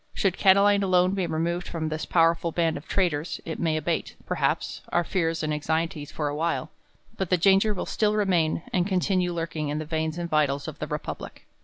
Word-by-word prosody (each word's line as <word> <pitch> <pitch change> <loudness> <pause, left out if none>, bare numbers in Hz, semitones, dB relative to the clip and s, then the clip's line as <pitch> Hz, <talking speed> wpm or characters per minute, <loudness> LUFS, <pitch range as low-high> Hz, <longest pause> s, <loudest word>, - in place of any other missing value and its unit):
Should 195 -2 +1
Catiline 200 +1 +5
alone 185 -1 +3
be 190 -3 -1
removed 170 +2 -1
from 160 -2 -3
this 155 0 -4
powerful 165 0 +3
band 165 -1 +1
of 145 - -8
traitors. 170 -4 0
It 160 - -5
may 160 -2 +1
abate, 155 - -2
perhaps, - - -1
our 175 - +2
fears 165 -3 -1
and 155 0 0
.anxieties 160 0 -2
for 150 - -2
a 145 - -2
Tvhile; 160 +1 -1 0.5
but 190 -3 -2
the 180 - +3
danger 195 +4 +4
will - - -3
still 210 -1 +1
remain, 175 -6 +1
and 180 0 +2
continue 185 -2 +1
lurkmg 165 -3 -3
in 150 - -2
the 155 - -3
veins 160 +1 -2
and 175 0 -3
vitals 145 -3 +1
of - - -7
the - - -3
republic. - - -6
170 Hz, 200 wpm, -26 LUFS, 155-185 Hz, 0.5 s, Catiline